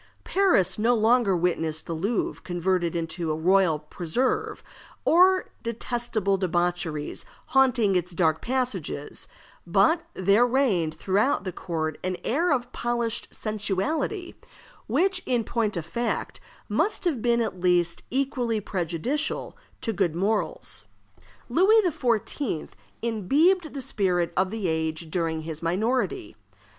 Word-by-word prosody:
Paris 350 - +2
no 235 +3 +3
longer 225 -3 +3
witnessed 165 -2 -1
the 170 - -4
Louvre 200 +8 -1
converted 175 -1 -1
into 165 0 -2
a - - 0
royal 180 0 +3
preserve, 250 - -2 0.4
or 370 +3 +4
detestable 230 -4 -1
debauchees 175 -4 -1 0.3
haunting 250 -7 +3
its 180 0 0
dark 160 -2 +2
passages; 230 - -2 0.4
but 200 - +4
there 200 +6 +4
reigned 210 - +1
throughout 200 - +1
the 185 - -3
court 160 -3 -3
an 185 -1 -2
air 330 +8 +1
of 245 -3 0
polished 235 -1 -1
sensuality, 225 - -2 0.5
which, 375 0 +1
in 245 -3 +1
point 215 -3 -1
of 165 - -3
fact, 235 +8 -3 0.3
must 430 - 0
have 295 -10 0
been 235 0 +2
at 225 -5 -2
least 175 -2 +2
equally 250 -4 0
prejudicial 195 - -2 0.3
to 225 - -1
good 170 -4 0
morals. 205 +5 -1 0.6
Louis 425 +6 +5
XIV. 240 - -1 0.3
imbibed 295 - +2
the 275 - -3
spirit 185 -9 0
of 185 0 +2
the 215 -2 -3
age 160 0 -2
during 165 -2 -1
his 160 -1 -6
minority. 195 - -1
200 Hz, 125 wpm, -26 LUFS, 175-250 Hz, 0.6 s, Louis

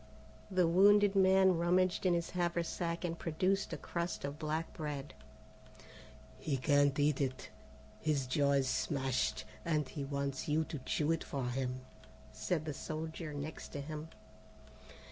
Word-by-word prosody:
The 185 -2 +3
wounded 200 +3 +6
man 190 -2 +5
rummaged 180 +2 +2
in 175 - +4
his 170 -1 -2
haversack 170 -1 -1
and 165 -1 -3
produced 185 +5 0
a - - -3
crust 170 -3 -3
of 140 +2 -5
black 155 +1 -2
bread. 150 -3 -5 1.3
"He 140 -3 -1
can't 145 +1 +3
eat 145 -1 +2
it, 130 -2 -3 0.5
his 150 -4 0
jaw 140 +2 +2
is 135 -1 +2
smashed, 130 -5 0 0.2
and 155 -4 0
he 145 - -5
wants 140 +1 -3
you 155 +1 +2
to 155 -2 -6
chew 150 +4 0
it 165 - 0
for 135 -3 -3
him," 130 0 -2 0.5
said 160 -4 -2
the 155 - -3
soldier 160 +2 -5
next 145 +2 -6
to 145 - -4
him. 155 +2 -6
155 Hz, 145 wpm, -34 LUFS, 140-170 Hz, 1.3 s, wounded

